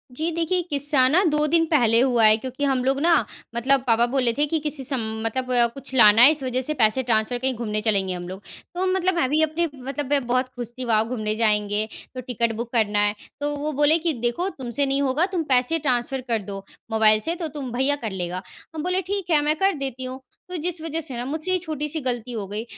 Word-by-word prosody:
जी 320 +5 -1
देखिए, 335 +2 0
किस्सा 285 -3 +3
ना 335 +9 +3
2 300 0 +1
दिन 330 +2 +3
पहले 235 -6 +4
हुआ 245 -3 +2
है 215 0 +6
क्योंकि 260 +4 -6
हम 265 -2 +1
लोग 270 +1 +1
ना 335 +2 +4 0.4
मतलब 260 +3 +2
पापा 235 0 +4
बोले 255 -3 +2
थे 295 - +3
कि 320 +2 -1
किसी 300 -2 -3
स 265 - +1 0.3
मतलब 245 0 +1
कुछ 275 0 -10
लाना 215 -2 +7
है 265 +5 +9
इस 305 -2 -3
वजह 255 0 -1
से 305 +4 -2
पैसे 245 -1 +2
ट्रांसफर 230 0 +1
कहीं 260 +1 0
घूमने 215 -2 -3
चलेंगे 200 -4 0
हम 175 -1 -6
लोग। 190 +2 -8 0.3
तो 365 +1 -1
मतलब 375 0 +2
मैं 265 -7 +1
भी 305 +3 +3
अपने 315 +2 0
मतलब 275 +2 -5
मैं 285 -3 +1
बहुत 255 +1 +1
खुश 240 -2 -5
थी 255 - -3
वॉव 225 -1 +1
घूमने 215 -4 -2
जाएँगे 210 -1 +1 0.3
तो 255 - -4
टिकट 235 -2 -1
बुक 235 +1 -5
करना 210 -3 +2
है 205 0 +1 0.2
तो 290 0 -2
वो 300 +2 -3
बोले 295 +3 +4
कि 330 0 0
देखो 245 +10 0
तुमसे 265 - -1
नहीं 275 +1 0
होगा 280 +5 +1
तुम 345 -3 0
पैसे 255 +6 +3
ट्रांसफर 265 -2 0
कर 230 -2 +1
दो 195 -1 -7 0.3
मोबाइल 215 -1 +4
से 330 +9 -1
तो 335 -2 -4
तुम 285 -4 -6
भैया 265 +4 +1
कर 215 - -2
लेगा। 180 -1 -4 0.3
हम 310 - -4
बोले 365 +1 0
ठीक 385 0 -4
है, 310 -3 +4
मैं 300 +1 +1
कर 390 0 +3
देती 265 -2 -4
हूँ 255 +1 -6 0.3
तो 360 - -4
जिस 335 +1 -2
वजह 325 0 -3
से 275 -6 -7
ना 240 - -4
मुझसे 310 +6 -3
ये 370 - +3
छोटी-सी 310 -2 -4
गलती 245 -2 -3
हो 220 -4 -4
गई। 210 +3 -4
260 Hz, 240 wpm, -23 LUFS, 230-300 Hz, 0.4 s, है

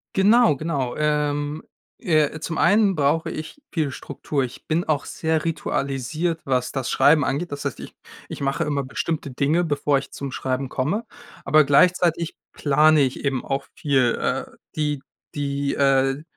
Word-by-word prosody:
Genau, 210 - +5
genau. 140 -5 -2
Ähm, 150 0 -1 0.4
äh, 155 - +1
zum 165 +1 -4
einen 205 -2 +4
brauche 150 +2 +1
ich 155 - -7
viel 155 -5 -1
Struktur. 140 +1 -3
Ich 125 - -8
bin 165 +2 +1
auch 150 -3 0
sehr 160 0 -1
ritualisiert, 155 +2 -2
was 125 -2 0
das 135 -3 -3
Schreiben 150 0 +4
angeht. 150 +5 -2
Das 145 0 -5
heißt, 140 - -3
ich - - -10 0.3
ich - - -8
mache 135 +1 0
immer 145 -2 -1
bestimmte 150 +2 -3
Dinge, 145 +7 +1
bevor 145 -2 +1
ich 140 - -10
zum 140 -2 -6
Schreiben 130 +1 -2
komme, 190 - -1 0.4
aber 155 +2 +5
gleichzeitig 170 +2 +3 0.2
plane 150 +1 +4
ich 130 +1 -1
eben 135 -3 -1
auch 135 0 -2
viel, 130 -5 +2
äh, - - -1 0.3
die 150 -3 -1 0.3
die, 140 -1 -1
äh 135 +1 +2
145 Hz, 160 wpm, -23 LUFS, 140-160 Hz, 0.4 s, Genau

